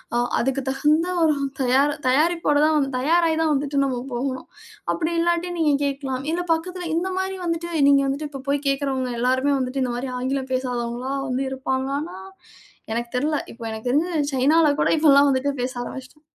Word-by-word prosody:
அ - - +3 0.2
அதுக்கு 270 +2 0
தகுந்த 300 +5 +2 0.2
ஒரு 315 -1 +4 0.3
தயார 265 +3 +3 0.2
தயாரிப்போடதான் 300 0 +3
தயாராய்தான் 320 +2 +2
வந்துட்டு 280 0 0
நம்ம 260 -2 -1 0.2
போகணும். 260 +1 -3 0.5
அப்படி 335 0 -2
இல்லாட்டி 345 +1 +1
நீங்க 305 -3 +3
கேட்கலாம், 275 -2 -3
இல்ல 350 +2 -1
பக்கத்துல 355 +2 -4
இந்த 355 +3 0
மாதிரி 380 0 -2
வந்துட்டு 335 0 -2 0.2
நீங்க 280 -1 +5
வந்துட்டு 285 +2 -3
இப்போ 275 -2 -7
போய்க் 285 0 0
கேக்கறவங்க 270 -2 -1
எல்லாருமே 260 +3 +2
வந்துட்டு 260 +1 -1
இந்த 250 -1 -2
மாரி 255 +2 -4
ஆங்கிலம் 260 +1 -2
பேசாதவங்களா 250 0 -2 0.2
வந்து 255 +2 -1
இருப்பாங்களான்னா 265 +4 -3 0.7
எனக்கு 235 +1 -2
தெர்ல. 300 +4 0
இப்போ 230 0 -11
எனக்கு 220 +2 -6
தெரிஞ்சு 310 +4 +1
சைனால 295 +4 +4
கூட - - +2
இப்போ 310 0 +4
எல்லாம் 280 +1 +6
வந்துட்டு 265 +2 0
பேச 255 +1 -2
ஆரம்பிச்சிட்டாங்க. 265 +5 -10
275 Hz, 160 wpm, -23 LUFS, 260-315 Hz, 0.7 s, எல்லாம்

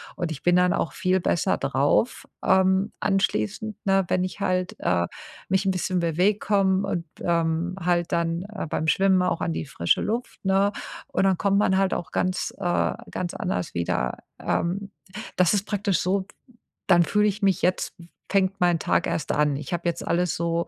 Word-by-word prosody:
Und 175 -3 -3
ich 145 - -7
bin 175 0 +4
dann 180 +1 +4
auch 165 - -1
viel 185 0 +1
besser 170 - +1
drauf, 140 - +1 0.2
ähm, 190 +2 +3
anschließend, 195 - 0
ne, 195 -1 +2
wenn 185 0 +2
ich 185 - -5
halt, 185 -1 0
äh, 85 -1 +1 0.4
mich 190 +1 +2
'n 190 - +3
bisschen 185 0 -1
bewege, 180 +5 +2
komme 195 -2 +1
und, 175 -3 -2 0.2
ähm, 170 +1 0
halt 175 -1 +1
dann, 170 +1 0
äh, 205 -4 -6
beim 160 - -1
Schwimmen 190 +2 +3
auch 175 -2 0
an 165 - -1
die - - -3
frische 85 - +1
Luft, 230 -2 -4
ne? 195 +1 +3 0.4
Und - - 0
dann 190 -1 +4
kommt 200 0 +2
man 190 -2 +3
halt 195 0 +1
auch 175 - -5
ganz, 185 0 -1
äh, 175 -2 +1 0.2
ganz 175 -1 -4
anders 90 - -3
wieder. 85 -7 -1 0.2
Ähm, 195 +4 -2 0.4
das 185 +3 +3
ist 205 - -1
praktisch 200 -3 0
so, 190 +1 0 0.6
dann 175 -2 +6
fühle 210 +4 +2
ich 210 +1 -2
mich: 195 -2 +2
„Jetzt, 185 0 0
f 170 - -12 0.3
fängt 195 0 +1
mein 175 -1 +3
Tag - - +1
erst 155 - -2
an.“ 150 -1 +2
Ich 150 +5 -5
habe 175 0 -2
jetzt 170 - -5
alles, 175 -1 0
ähm, 170 0 0
185 Hz, 190 wpm, -25 LUFS, 170-195 Hz, 0.6 s, dann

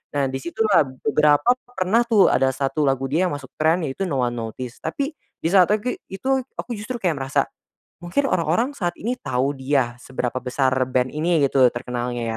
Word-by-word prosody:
Nah 140 -1 +2
di 135 - -3
situlah, 170 +3 +2 0.2
beberapa 150 +8 +4 0.2
pernah 225 0 +1
tuh 220 -4 +5
ada 135 - +3
1 140 +3 -1
lagu 135 0 +1
dia 180 +4 +2
yang 145 - -2
masuk 135 -2 -10
trend 160 +2 +3
yaitu 195 +9 -4
No 135 -7 0
One 120 0 -1
Notice, 120 +2 -6
tapi 275 - -2 0.3
di - - -1
saat 185 -3 +6
tegi 215 +4 -1
itu 265 +7 0 0.2
aku 245 - -5
justru 245 +4 -5
kayak 175 -6 0
merasa, 135 0 +1 0.6
mungkin 275 +11 0
orang-orang 180 - +1
saat 175 -8 -1
ini 240 +4 -2
tahu 135 - -1
dia, 130 -3 0
seberapa 125 -2 -3
besar 130 +1 +1 0.2
band 125 0 +2
ini 165 +1 +2
gitu 130 -2 +5
terkenalnya 120 0 -4
150 Hz, 185 wpm, -22 LUFS, 130-195 Hz, 0.6 s, saat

